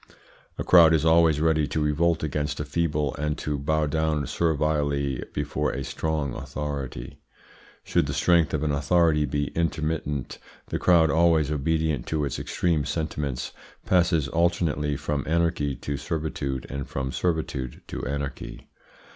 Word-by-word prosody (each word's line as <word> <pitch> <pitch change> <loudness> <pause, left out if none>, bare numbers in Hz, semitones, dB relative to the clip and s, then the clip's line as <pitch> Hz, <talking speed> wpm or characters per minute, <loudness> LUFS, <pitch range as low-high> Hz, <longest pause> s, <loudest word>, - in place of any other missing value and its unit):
A - - -2
crowd 85 -2 +7
is 80 0 0
always 80 -2 +5
ready 80 -1 +2
to 75 +2 -2
revolt 80 +2 +1
against 75 -1 -2
a 75 - -2
feeble, 75 -2 -1
and 75 0 -1
to 75 -1 -3
bow 80 +2 +1
down 80 -1 0
servilely 75 -4 0
before 75 0 -1
a 70 - -3
strong 75 -2 -2
authority. 70 -5 -5 0.6
Should 85 -4 +1
the 70 - -2
strength 85 +2 +3
of 75 - -2
an 75 - +1
authority 75 +1 +3
be 70 +1 -1
intermittent, 80 -4 -2 0.3
the - - -2
crowd, 85 -3 +4
always 80 -3 +3
obedient 75 -2 0
to 75 -2 0
its 70 - -3
extreme 80 -4 0
sentiments, 75 -4 -3 0.3
passes 85 -5 +2
alternately 80 -3 0
from 75 -1 -2
anarchy 85 -4 +1
to 70 +3 -4
servitude, 70 -3 -3
and 70 -1 -5
from 65 0 -3
servitude 75 -8 -2
to - - -5
anarchy. 70 -1 -5
75 Hz, 145 wpm, -25 LUFS, 70-80 Hz, 0.6 s, crowd